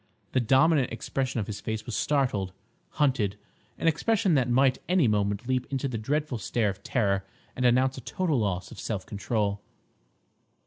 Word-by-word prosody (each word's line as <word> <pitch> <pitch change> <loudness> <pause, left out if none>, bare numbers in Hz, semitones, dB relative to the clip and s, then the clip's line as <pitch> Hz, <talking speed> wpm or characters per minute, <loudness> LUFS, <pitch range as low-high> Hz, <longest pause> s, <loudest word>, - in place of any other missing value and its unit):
The 130 - +2
dominant 135 +3 +4
expression 130 +2 -2
of 105 - -1
his 105 -1 -6
face 110 0 -4
was 120 - -4
startled—hunted; 115 -1 -1 0.4
an - - -1
expression 195 +4 +2
that 130 -4 +2
might 130 +1 +3
any 180 -7 +4
moment 105 +1 0
leap 130 -1 0
into 135 0 -1
the 120 -4 -3
dreadful 140 +2 -1
stare 105 +3 0
of 95 - -12
terror 100 -5 0 0.3
and 125 - -1
announce 130 +2 +2
a - - -10
total 160 +1 0
loss 95 -4 -2
of - - -10
self 105 -4 -3
control. 100 -1 -1
120 Hz, 165 wpm, -27 LUFS, 105-135 Hz, 0.4 s, dominant